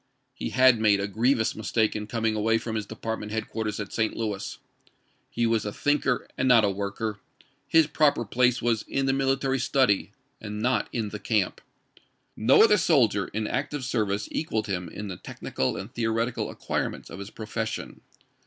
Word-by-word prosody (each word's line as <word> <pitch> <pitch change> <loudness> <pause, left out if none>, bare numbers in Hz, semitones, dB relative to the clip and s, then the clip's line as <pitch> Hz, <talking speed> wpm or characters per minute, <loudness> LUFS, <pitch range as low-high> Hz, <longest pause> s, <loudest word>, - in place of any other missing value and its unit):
He - - -4
had 130 -3 +5
made 105 -2 +4
a 100 - -1
grievous 110 +3 +1
mistake 110 0 0
in 105 -1 -4
coming 110 -1 0
away 110 +1 +2
from 115 0 -4
his 105 -2 -3
dej^art 110 0 -4
ment 105 0 -7
headquarters 110 -1 -3
at 100 - -5
St. 110 -1 0
Louis. 105 -4 -3 0.7
He 120 - 0
was 115 -2 +2
a 105 - -3
thinker 135 +1 0
and 130 - +2
not 115 -4 +6
a 100 - +1
worker; 100 +2 -3 0.5
his 160 -1 +5
proper 145 -6 +2
place 125 +3 +2
was 115 -2 +2
in 135 - 0
the 135 - +2
mil 135 0 +2
itary 135 -1 -1
study 130 -6 +2 0.3
and 105 -1 -5
not 125 +3 +1
in 110 -3 -2
the 105 - -6
camp. 105 -4 0 0.7
No 125 - +6
other 210 -2 +6
soldier 120 - +3
in 110 +1 -3
active 135 +3 -2
service 105 -5 -1
equaled 110 -9 -1
him 90 -4 -3
in 105 +5 -6
the 90 -2 -6
technical 65 - -3
and 100 +5 -7
theoretical 115 +1 -1
acquirements - - -4
of - - -8
his 100 0 -7
profession. 110 -1 -5
110 Hz, 180 wpm, -26 LUFS, 105-125 Hz, 0.7 s, not